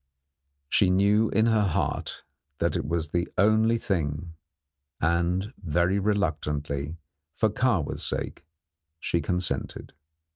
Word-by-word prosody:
She 95 +6 +3
knew 100 +4 +3
in 110 +3 +3
her 110 -2 +3
heart 95 -5 -1 0.3
that - - 0
it - - -1
was 80 -1 -1
the 85 +2 0
only 110 +3 +4
thing, 85 -5 -2 0.7
and 90 +6 +1
very 90 +4 +1
reluctantly, 75 -7 -1 0.4
for 110 -2 +2
Kahwa's 105 - 0
sake, - - -3 0.6
she 85 - 0
consented. 90 -1 -3
90 Hz, 110 wpm, -27 LUFS, 85-105 Hz, 0.7 s, only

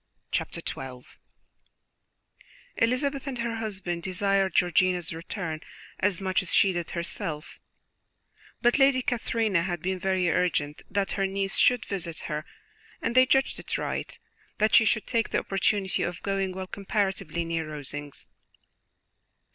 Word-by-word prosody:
Chapter - - -1
XII 130 -2 -6 1.7
Elizabeth 270 +4 +1
and 265 -2 -3
her 230 -1 -2
husband 195 -6 -2
desired 195 +1 +1
Georgiana's 180 -1 +3
return 165 -1 -4 0.4
as 190 -3 +2
much 190 +1 +1
as 185 - -5
she 195 - +5
did 175 -2 -3
herself, 165 -2 -4 1.0
but 240 +4 +4
Lady 270 -2 +5
Catherine 230 -4 0
had 175 0 +1
been 185 +2 -2
very 190 -1 +1
urgent 160 -4 +1
that 195 0 0
her 195 -1 +1
niece 195 0 0
should 250 -3 +4
visit 175 -5 -4
her, 150 +1 -3 0.5
and - - -1
they 255 +1 +6
judged 270 0 +2
it - - -3
right - - -3 0.4
that 215 +1 +2
she 225 - +8
should 215 0 +2
take 230 -3 +1
the - - +1
opportunity 195 0 +1
of 175 +1 -3
going, 195 -1 0
while 185 0 -5
comparatively 190 -4 -1
near 165 -1 -2
Rosings. 145 -1 -6
190 Hz, 140 wpm, -27 LUFS, 170-215 Hz, 1.7 s, she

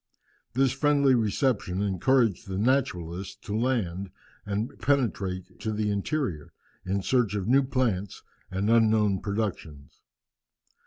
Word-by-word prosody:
This 135 +1 +3
friendly 140 0 +3
reception 110 -4 0
encouraged 105 +2 +1
the 95 -1 -4
naturalists 95 -7 -1
to 105 -2 -3
land 105 -6 -1 0.4
and 105 +3 -2
penetrate 100 -10 -1
to 110 - -2
the 105 0 -1
interior, 100 - -2 0.3
in 95 +1 -2
search 120 -5 +1
of 100 -1 -2
new 135 +4 +5
plants 120 -8 -1 0.3
and 100 +4 0
unknown 110 -4 +3
productions. 95 -9 -4
105 Hz, 115 wpm, -27 LUFS, 95-130 Hz, 0.4 s, new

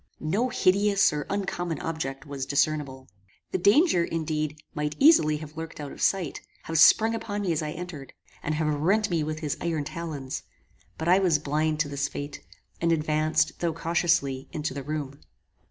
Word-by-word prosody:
No 205 +12 0
hideous 200 -3 +3
or 150 -1 -3
uncommon 175 -4 -2
object 155 -4 -4
was 140 -2 -5
discernible. 140 -2 0 0.4
The 185 - 0
danger, 205 - +4
indeed, 155 -2 -2 0.2
might 150 0 -2
easily 270 - +5
have 155 0 -10
lurked 160 0 -7
out 145 -2 -6
of - - -10
sight, 185 -6 0 0.2
have 165 -1 -1
sprung 220 +7 +6
upon 205 -2 -3
me 185 - 0
as 160 - 0
I 155 - -3
entered, 165 -5 -8 0.3
and 155 - -2
have 155 -1 0
rent 190 +8 +1
me 165 -3 +1
with 155 +1 -4
his 150 -3 -2
iron 165 -3 -1
talons; 150 -3 -5 0.6
but 160 - -4
I 180 +2 +6
was 180 -6 +3
blind 155 +1 -1
to 155 - 0
this 140 0 -1
fate, 145 0 -6 0.4
and 170 0 +2
advanced, 155 -1 +1
though 170 -2 0
cautiously, 165 -5 0
into 150 -3 -3
the 140 - -5
room. 145 -1 -5
155 Hz, 175 wpm, -27 LUFS, 150-175 Hz, 0.6 s, sprung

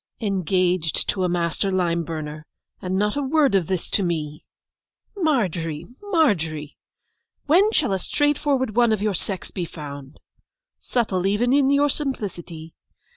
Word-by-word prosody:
'Engaged 185 -4 0
to 190 - 0
a 180 - +1
master 175 +2 0
lime 170 -2 +1
burner, 155 -2 -6 0.4
and 185 -1 -1
not 210 +1 +1
a 285 - 0
word 285 -2 +2
of 185 -5 +2
this 185 -3 -2
to - - +2
me! 155 -4 -2 0.7
Margery, 180 - 0 0.2
Margery! 175 - 0 0.7
when 370 +8 +5
shall 280 - +1
a 190 - 0
straightforward 280 -1 0
one 240 -1 +4
of 210 -2 0
your 210 -1 +1
sex 190 +1 -4
be 180 - -3
found! 145 -4 -8 0.6
Subtle 195 -6 0
even 230 +6 +2
in 275 -1 +4
your 280 +1 +4
simplicity! 185 - -4
190 Hz, 140 wpm, -23 LUFS, 165-260 Hz, 0.7 s, when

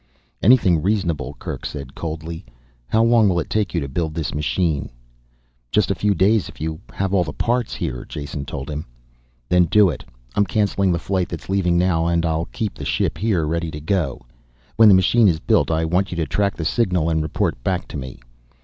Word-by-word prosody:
"Anything 95 -8 +5
reasonable," 85 -9 -1
Kerk - - -6
said 70 -2 -6
coldly. 80 +1 -6 0.4
"How 110 - +3
long 115 -3 +5
will 85 -2 +1
it 80 - -5
take 105 -4 0
you 85 - +1
to 70 - -3
build 80 +3 -3
this 80 -3 -3
machine?" 75 +1 -1 0.8
"Just 105 -2 +2
a - - +3
few 100 +1 +1
days 100 +4 +2
if - - -14
you 80 0 -3
have 95 0 -2
all 95 -2 +4
the 75 - -5
parts 120 0 -1
here," - - -4
Jason 70 -1 -5
told 70 -1 -6
him. 75 0 -5 0.6
"Then 90 +5 +4
do 100 +3 +5
it. 70 - -8 0.3
I'm 105 - +2
canceling 100 0 +1
the 85 - +1
flight 90 0 -1
that's 85 - -7
leaving 90 -3 +2
now 85 -2 +2
and 85 0 +1
I'll 80 0 0
keep 110 +1 -4
the - - -9
ship - - 0
here, 100 -7 +1
ready 85 +1 -1
to 75 - -7
go. 80 -5 -1 0.5
When 110 -1 +7
the 100 - +8
machine 105 +5 +4
is 80 -4 +2
built - - +2
I 80 0 +1
want 90 +4 +1
you - - -5
to 80 - 0
track 100 +8 0
the 80 - -3
signal 90 -4 +1
and 80 -1 +1
report 75 -5 -2
back 90 -1 -1
to - - -5
me." 65 -2 -7
85 Hz, 210 wpm, -21 LUFS, 80-100 Hz, 0.8 s, the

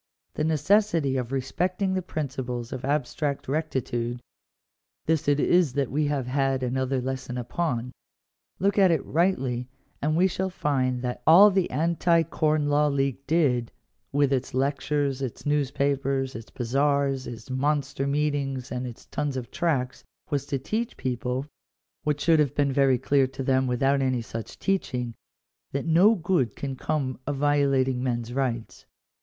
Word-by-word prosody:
The 150 - -2
necessity 160 -2 +2
of 125 -1 -2
respecting 180 +8 -1
the 185 - 0
principles 130 -8 -4
of 130 - -6
abstract 140 +1 -1
rectitude 125 -5 -2 0.4
— - - -61
this 160 -2 +1
it 145 0 +3
is 175 -4 +3
that 140 -2 -1
we 150 +2 +1
have 140 -3 -1
had 135 0 0
another 130 +1 0
lesson 130 -1 -4
upon. 125 0 -2 0.7
Look 200 +2 +1
at 190 -2 +6
it 165 -4 +1
rightly 135 -8 0 0.3
and 155 +2 +1
we 180 - +5
shall 190 0 -1
find 130 -7 -1
that 125 0 -3
all 195 +6 +9
the 190 -2 +1
Anti 170 +1 +2
Corn 155 -2 0
Law 145 +1 +3
League 140 -1 -1
did, 135 -8 +2 0.4
with 140 -1 +2
its 130 -1 -2
lectures, 140 0 0
its 130 +1 -5
news 145 -2 +1
papers, 140 -1 0
its 115 0 -8
bazaars, 135 +2 0
its 115 +2 -8
monster 140 0 0
meetings, 140 -3 -1
and 125 0 -3
its 120 - -10
tons 145 -2 -3
of 120 -3 -6
tracts, 135 -7 -1 0.3
was 140 -1 -1
to 140 - -1
teach 220 - -3
people 125 +1 -2 0.3
— - - -60
what 150 -1 0
should 160 +1 +4
have 145 -4 +1
been 140 -2 +1
very 135 -2 +4
clear 135 +1 +2
to 135 +1 -6
them 130 0 +2
without 135 +3 +2
any 130 -3 0
such 115 0 -7
teaching 125 -11 -1 0.3
— - - -59
that 140 - -2
no 180 +7 +5
good 170 - 0
can 135 -1 -4
come 135 -2 -2
of 145 - -1
violating 135 -3 +2
men's 120 -2 -2
rights. 125 -4 -3
140 Hz, 160 wpm, -26 LUFS, 130-150 Hz, 0.7 s, all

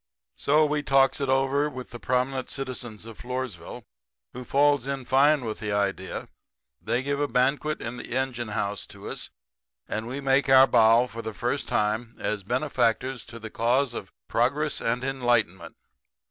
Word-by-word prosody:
"So 155 +2 +3
we 150 0 0
talks 135 -1 +3
it 135 - -1
over 135 +2 +2
to 130 -3 -7
the 120 - -11
prominent 130 +2 -1
citizens 125 -5 -5
of 115 -2 -11
Floresville, 125 -4 -5 0.5
who 125 - -7
falls 140 0 +2
in 135 -2 -3
fine 140 +1 +4
with 110 -1 -4
the 105 -1 -3
idea. 100 -2 -2 0.5
They 120 +2 -1
give 140 +1 -1
a 145 - +1
banquet 140 +4 +1
in 120 +1 -5
the 120 - -4
engine 125 -3 -2
house 100 -3 -3
to - - -11
us, - - -5 0.6
and 110 +2 -3
we 130 +3 -4
make 135 0 +2
our 135 0 +8
bow 115 -1 +5
for 115 -1 -7
the 110 -2 -6
first 125 +4 -2
time 110 +2 -1
as 105 -1 -2
benefactors 125 +2 0
to 115 - -10
the 110 -1 -8
cause 125 +2 +1
of - - -7 0.2
progress - - +1
and 120 +2 -1
enlightenment. 120 -10 0
125 Hz, 170 wpm, -26 LUFS, 115-135 Hz, 0.6 s, our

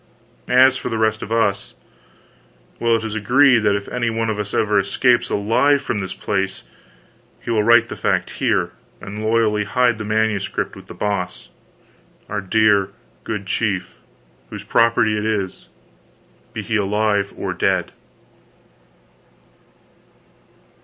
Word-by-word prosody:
As 130 +1 +5
for 125 - -5
the 115 - -2
rest 110 0 +1
of 110 - -7
us 100 -4 0 1.0
well, 115 0 +2
it 115 - -2
is 110 -1 -4
agreed 125 +4 +4
that 105 -2 +2
if 100 0 -4
any 120 -1 -1
one 115 0 -1
of 105 - -4
us 105 -1 -3
ever 105 -1 +2
escapes 120 +5 +2
alive 125 +8 +2
from 115 - -2
this 95 -2 -5
place, - - -3 0.8
he - - -5
will 110 -2 +2
write 115 +1 +5
the - - -7
fact - - -1
here, - - +1 0.3
and 105 +2 -7
loyally 110 -1 +2
hide 120 +2 +1
this 110 - -5
Manuscript 110 -2 -1
with - - -13
The - - -10
Boss, 100 -3 -3 0.8
our 105 0 -2
dear 100 0 +2 0.3
good 105 -3 -4
chief, 95 -2 -2 0.5
whose - - -8
property 115 -2 +2
it 105 - -2
is, 105 -4 -3 0.8
be - - -5
he 110 - -1
alive 105 0 0
or - - -3
dead. - - 0
110 Hz, 140 wpm, -20 LUFS, 100-115 Hz, 1.0 s, As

